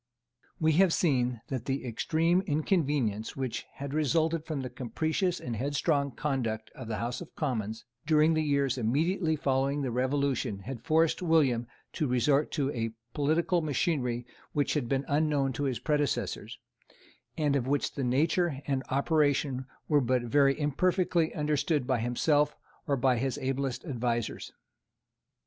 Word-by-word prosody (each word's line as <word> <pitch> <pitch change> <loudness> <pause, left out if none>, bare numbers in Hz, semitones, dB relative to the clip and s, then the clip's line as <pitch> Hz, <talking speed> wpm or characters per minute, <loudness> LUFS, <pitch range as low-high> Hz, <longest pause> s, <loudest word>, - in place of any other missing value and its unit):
We 160 0 +3
have 185 -4 +4
seen 125 -7 +1
that 130 -3 -3
the 135 -1 -2
extreme 165 +9 +1
inconvenience 145 - 0
which 130 -4 -4
had 140 0 -6
resulted 160 +2 +1
from 150 -4 -2
the 130 - -4
capricious 160 - -1
and 120 -2 -4
headstrong 140 +3 0
conduct 120 -6 -2
of 130 - -9
the 110 -1 -2
House 120 +5 -3
of 175 - -11
Commons 110 -7 -3 0.2
during 155 0 +4
the 155 - +2
years 140 -4 +1
immediately 160 - +1
following 140 0 0
the 130 - -1
Revolution 130 -4 0
had 125 +4 -7
forced 160 +1 +2
William 140 -9 +2 0.3
to 150 - -1
resort 135 +4 +2
to 140 -3 0
a 115 -3 -3 0.2
political 165 +4 +1
machinery 135 -5 -1 0.3
which 145 -1 +1
had 135 -6 -1
been 135 0 0
unknown 145 -2 +1
to 145 +4 -2
his 130 -3 0
predecessors, 145 +3 -1 0.8
and 150 -3 +2
of 130 -2 0
which 145 +1 0
the 140 - -3
nature 150 +4 +1
and 135 -2 0
operation 140 -2 +1 0.2
were 150 -2 +4
but 125 0 +1
very 135 +4 +3
imperfectly 170 +3 +1
understood 150 -1 0
by 130 -2 +1
himself 145 +6 +2 0.3
or 140 -2 +1
by 130 -1 +3
his 135 +3 -1
ablest 135 0 -2
advisers. 120 -5 -2
140 Hz, 150 wpm, -29 LUFS, 125-155 Hz, 0.8 s, have